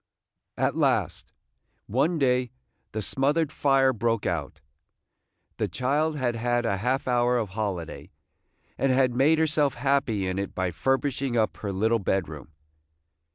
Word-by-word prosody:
At - - 0
last, - - 0 0.5
one 140 - +1
day, 125 -3 +1 0.4
the 110 0 -3
smothered 145 - +1
fire 135 -3 +3
broke 115 -1 -1
out. 75 -3 -3 1.0
The - - 0
child 150 +5 0
had 125 -3 -1
had 120 +1 0
a 100 -4 0
half 125 +7 -1
hour 125 0 +2
of 110 -4 -2
holiday, 95 -5 -4 0.7
and 135 - +2
had 130 -1 +3
made 140 +6 +3
herself 150 -3 +1
happy 135 -8 0
in 95 +1 -2
it 100 - -4
by 95 -1 -1
furbishing 135 - -1
up 110 -1 +1
her 100 - -4
little 110 +4 +1
bedroom. 80 -8 -2
120 Hz, 140 wpm, -26 LUFS, 100-135 Hz, 1.0 s, fire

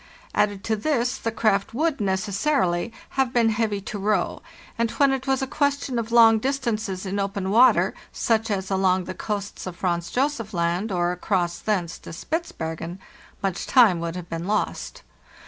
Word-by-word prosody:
Added 205 -1 +1
to 220 - 0
this, 250 +1 0
the 225 - -2
craft 215 -1 +1
would, 305 -1 0
necessarily, 195 +1 0 0.3
have 260 -2 0
been 235 -2 +3
heavy 215 -2 0
to 205 +1 -6
row; 200 -2 0 0.3
and 230 0 0
when 280 +2 +3
it 270 0 -2
was 270 0 +1
a - - +1
question 280 -2 0
of 230 0 -4
long 225 -1 +7
distances 220 -7 -2
in 195 +1 -2
open 195 -1 -2
water, 240 +5 +5 0.2
such 225 -1 0
as 195 -2 -2
along 190 -1 +2
the 185 - -6
coasts 200 +1 -4
of 180 - -6
Franz 175 -3 -1
Josef 250 -6 -1
Land, 175 +5 0
or 175 -1 +1
across 180 -1 -1
thence 185 -6 -1
to - - -10
Spitzbergen, 170 - -4 0.5
much 195 -2 -2
time 225 -10 +5
would 170 0 -3
have 180 -2 -6
been 165 +2 -4
lost. 210 +1 -2
210 Hz, 170 wpm, -24 LUFS, 185-235 Hz, 0.5 s, long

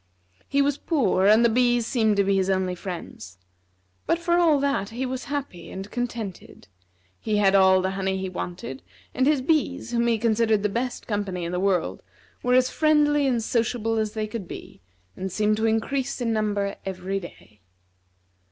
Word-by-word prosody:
He 280 0 +3
was 285 0 0
poor, 210 - +2
and 220 +3 +6
the - - +7
bees 240 0 +2
seemed 220 -4 +1
to 200 - +4
be 195 0 +1
his 190 0 +1
only 185 -1 +1
friends. 170 - -8 0.7
But, 335 - +2
for 345 +1 +1
all 320 -4 +4
that, 275 -8 0
he 245 +4 -3
was 255 0 -4
happy 280 -12 -5
and 195 +2 -7
contented; 235 - -5 0.5
he 215 -1 -1
had 195 -2 +4
all 190 -1 +5
the 190 - 0
honey 190 0 -1
he 190 0 -3
wanted, 175 -7 -6 0.3
and 260 +1 +1
his 290 -3 +2
bees, 275 -5 0
whom 235 0 +1
he 230 -1 +2
considered 220 -2 +2
the 210 - +2
best 245 +4 -3
company 200 -5 -3
in 170 - -4
the 180 - -1
world, 190 -3 0 0.4
were 250 0 +2
as 255 0 +3
friendly 295 -2 +3
and 240 -4 +1
sociable 225 -1 0
as 215 -1 -2
they 215 -1 -2
could 215 -3 -6
be, - - -10 0.3
and 190 0 -5
seemed 210 +2 +1
to 220 +1 +1
increase 250 +5 -1
in 235 -2 0
number 205 -2 -1
every 190 +1 -3
day. 110 - -13
220 Hz, 185 wpm, -25 LUFS, 190-250 Hz, 0.7 s, the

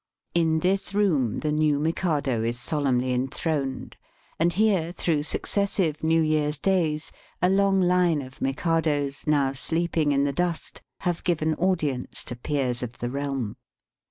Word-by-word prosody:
In 160 -2 +2
this 195 +2 0
room 155 - +1
the 150 - 0
new 150 -1 +2
Mikado 150 -6 0
is 120 +1 -2
solemnly 130 -2 0
enthroned, 135 +2 -2 0.4
and 170 +2 +3
here, 190 -3 +2
through 165 -4 0
successive 175 -1 0
New 160 0 +3
Tear's 150 -1 +1
days, 160 -3 0 0.3
a 180 - +3
long 195 0 +3
line 180 -4 +3
of 130 +1 -13
Mikados, 145 0 0
now 140 -3 +2
sleeping 160 +1 0
in 140 0 +2
the 140 -1 0
dust, 175 +1 -2 0.2
have 175 -2 -1
given 160 -2 +1
audience 155 -8 -1
to 125 - -5
peers 125 -1 -1
of 125 -1 -6
the 120 0 -3
realm. 135 -5 -3
155 Hz, 145 wpm, -25 LUFS, 135-170 Hz, 0.4 s, and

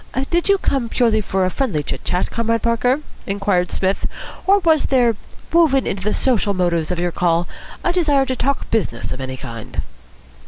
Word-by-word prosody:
"Did 345 +3 +1
you 400 - +5
come 270 -10 -1
purely 225 -3 +2
for 190 -2 0
friendly 195 - -1
chit - - -4
chat, 180 +1 -1
Comrade 230 -1 0
Parker," 245 +4 +2 0.3
inquired 195 -3 0
Psmith, 190 +1 0 0.4
"or 395 +1 +6
was 325 -6 +3
there, 245 -4 +3 0.4
woven 315 -6 +4
into 195 - -2
the 210 +3 0
social 210 -6 +2
motives 170 -3 +1
of 180 - -1
your 175 0 0
call, 170 0 +1 0.4
a 350 - +1
desire 295 -6 +3
to 260 - -2
talk 275 +3 -1
business 165 - -1
of 130 - -4
any 130 0 -5
kind?" 115 -4 -6
220 Hz, 175 wpm, -20 LUFS, 180-270 Hz, 0.4 s, or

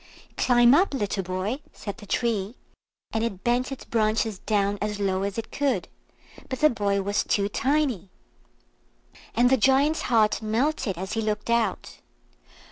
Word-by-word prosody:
"Climb 240 0 +5
up! 330 -1 +3
little 205 -5 -1
boy," 185 +7 -3
said 200 -2 -7
the 205 - -12
Tree, 220 -1 -1 0.6
and 220 - -1
it 195 -5 -4
bent 245 +3 +1
its 270 - -7
branches 220 -2 0
down 205 -1 0
as 210 0 -2
low 190 -1 0
as 200 +1 -3
it 225 - -5
could; 265 -10 0 0.6
but 260 - -4
the 305 - +5
boy 200 -3 0
was 200 +1 0
too 200 -1 +1
tiny. 260 - 0 1.3
And 245 +1 +4
the 265 - +5
Giant's 270 +6 +3
heart 220 -3 +3
melted 225 - -1
as 190 +3 -5
he 225 - -1
looked 215 +1 -2
out. 235 -1 -1
220 Hz, 155 wpm, -25 LUFS, 200-250 Hz, 1.3 s, Climb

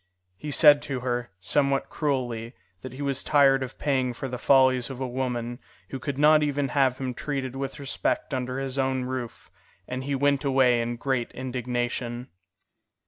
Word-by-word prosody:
He 150 - -7
said 145 0 +7
to 130 -3 -4
her, 120 -1 -2
somewhat 140 +7 0
cruelly, 125 -6 -2 0.3
that 130 -1 -8
he 140 +2 -6
was 140 -2 -1
tired 135 -2 +4
of 130 0 -6
paying 130 -4 0
for 135 - -5
the 125 -1 -5
follies 130 -2 +4
of 130 -2 -7
a 130 - -2
woman 120 -1 -3 0.3
who 135 - -5
could 135 +1 -4
not 150 +1 +6
even 145 -2 0
have 130 -2 +2
him 130 -1 -3
treated 135 -1 -4
with 135 0 -4
respect 135 0 -2
under 130 0 -2
his 135 0 -3
own 130 -1 0
roof, 125 -2 -6 0.4
and 130 +1 -4
he 140 +1 -2
went 140 +1 +2
away 130 -3 +3
in 120 +1 -2
great 125 -1 -2
indignation. 125 -1 -3
130 Hz, 175 wpm, -26 LUFS, 125-140 Hz, 0.4 s, said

